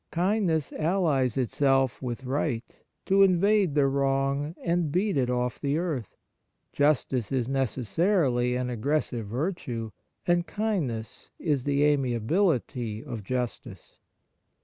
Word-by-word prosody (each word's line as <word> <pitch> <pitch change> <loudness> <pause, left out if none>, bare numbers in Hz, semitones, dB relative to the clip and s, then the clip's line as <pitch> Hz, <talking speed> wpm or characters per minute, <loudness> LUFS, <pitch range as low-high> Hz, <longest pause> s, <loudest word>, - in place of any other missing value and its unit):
Kindness 175 - 0
allies 155 - +1
itself 135 0 +1
with 125 0 -4
right 130 -2 -1 0.4
to 195 +1 +4
invade 195 -2 +4
the 145 -2 +4
wrong 140 +2 0
and 170 -3 0
beat 195 +4 +1
it 130 -3 +1
off 125 0 -1
the 140 +1 0
earth. 155 - -3 0.6
Justice 135 -6 +1
is 130 -3 0
necessarily 130 - +1
an 125 0 -2
aggressive 125 -2 -1
virtue, 125 - -3 0.3
and 175 0 +2
kindness 165 - -3
is 145 -6 -1
the 140 0 +2
amiability 130 - +1
of 115 - -5
justice. 125 +2 -5
140 Hz, 115 wpm, -27 LUFS, 125-170 Hz, 0.6 s, to